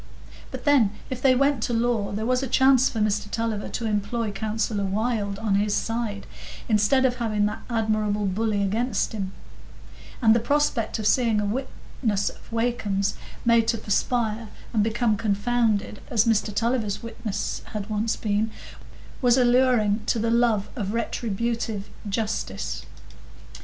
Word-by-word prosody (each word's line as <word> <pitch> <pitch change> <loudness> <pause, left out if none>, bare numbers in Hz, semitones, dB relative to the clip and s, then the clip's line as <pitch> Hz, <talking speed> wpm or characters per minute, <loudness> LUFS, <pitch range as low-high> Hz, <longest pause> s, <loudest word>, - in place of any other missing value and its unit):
But - - -8
then, 260 -9 +4 0.2
if 255 -1 -4
they 260 -2 +5
went 275 -1 +2
to 240 - -1
law, 230 -3 +1
there 215 +2 -2
was 250 +1 +2
a 270 - -2
chance 265 +1 +5
for - - -6
Mr 210 -1 0
Tulliver 225 -2 -2
to 235 - -4
employ 210 +1 -1
Counsellor 215 0 -2
Wylde 205 0 -1
on 210 -1 -1
his 205 +1 +2
side, 225 -3 -2 0.4
instead 220 +5 +3
of 250 -1 +1
having 215 -4 0
that 210 - -3
admirable 215 -2 0
bully 205 +1 0
against 215 +2 0
him; 195 -3 -3 0.9
and 220 -2 +5
the 230 - +3
prospect 285 -3 0
of 215 - -4
seeing 230 -1 +3
a 210 - 0
witness 220 -2 -2
of - - -15
Wakem's 215 -4 0 0.3
made 230 -1 +4
to 230 0 +2
perspire 220 +1 0 0.3
and 220 - +3
become 220 0 +1
confounded, 210 0 0
as 225 -1 +3
Mr 220 -2 +2
Tulliver's 225 -1 -1
witness 220 -3 -4
had 210 -2 -5
once 215 +1 0
been, 215 +1 0 0.7
was 245 -1 +4
alluring 245 -4 +3
to - - +2
the 230 +1 0
love 230 -4 +2
of 210 -2 -3
retributive 230 -2 -2 0.2
justice. 220 +2 -3
225 Hz, 150 wpm, -25 LUFS, 205-240 Hz, 0.9 s, they